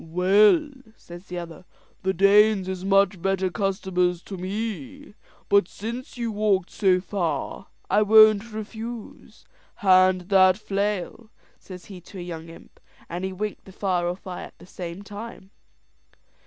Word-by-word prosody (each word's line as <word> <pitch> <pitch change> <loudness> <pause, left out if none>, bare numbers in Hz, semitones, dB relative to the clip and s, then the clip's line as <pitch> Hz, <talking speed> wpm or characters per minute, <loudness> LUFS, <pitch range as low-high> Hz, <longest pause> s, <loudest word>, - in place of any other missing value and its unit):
"Well," 205 - +3 0.3
says 175 +2 -12
the 180 - -6
other, 170 0 -8 0.4
"the 190 - 0
Danes 200 +1 +4
is 185 -1 -4
much 195 -1 +2
better 190 0 0
customers 180 -1 -1
to 195 - -8
me; 225 +9 -5 0.3
but 200 -3 +4
since 235 +7 -7
you 235 -1 -2
walked 205 -3 0
so 185 -2 +2
far 190 0 -3 0.2
I 210 - +3
won't 215 +1 +6
refuse. 220 +2 -8 0.3
Hand 185 -3 +4
that 185 -1 +5
flail," 205 +1 -3 0.3
says 180 -2 -11
he 190 -3 -11
to 190 - -13
a - - -6
young 165 -2 -7
imp; 165 - -15 0.3
and 175 +2 -5
he 190 - -2
winked 210 +2 -5
the 190 - -13
far 180 -3 -1
off 180 +2 -5
eye 185 -2 -6
at - - -11
the - - -15
same 180 +1 -8
time. 205 -1 -10
195 Hz, 150 wpm, -24 LUFS, 180-210 Hz, 0.4 s, won't